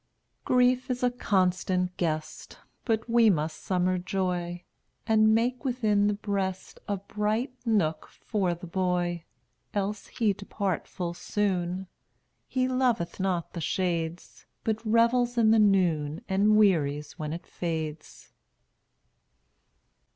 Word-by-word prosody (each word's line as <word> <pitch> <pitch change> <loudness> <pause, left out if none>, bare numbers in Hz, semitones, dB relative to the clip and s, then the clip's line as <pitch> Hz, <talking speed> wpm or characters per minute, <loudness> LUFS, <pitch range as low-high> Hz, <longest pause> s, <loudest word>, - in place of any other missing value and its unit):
215 250 0 +4
Grief 255 +2 -21
is 250 0 -2
a 250 - +3
constant 185 -3 +1
guest, 155 -3 -3 0.3
But 225 -2 0
we 230 -1 +5
must 155 -4 -1
summer 185 0 +1
Joy 180 -2 -2 0.4
And 220 0 +4
make 245 +3 0
within 215 -6 +2
the 210 - +1
breast 195 -2 -3
A 205 - -1
bright 210 +6 -2
nook 165 -9 +1
for 190 -5 -2
the 175 - -10
boy, 175 -1 -1 0.5
Else 205 +1 -2
he 215 -4 +1
depart 200 -2 -3
full 175 -2 -4
soon; 185 -1 -1 0.6
He 255 -1 0
loveth 250 -10 0
not 185 -3 -1
the 170 - -5
shades, 170 -1 -2 0.2
But 220 0 -1
revels 235 +2 +3
in 220 -2 +5
the 225 - +5
noon 170 -7 +2
And 205 +3 +3
wearies 150 -7 +2
when 150 -1 -3
it 170 +2 -6
fades. 160 -3 -5
195 Hz, 125 wpm, -28 LUFS, 175-220 Hz, 0.6 s, we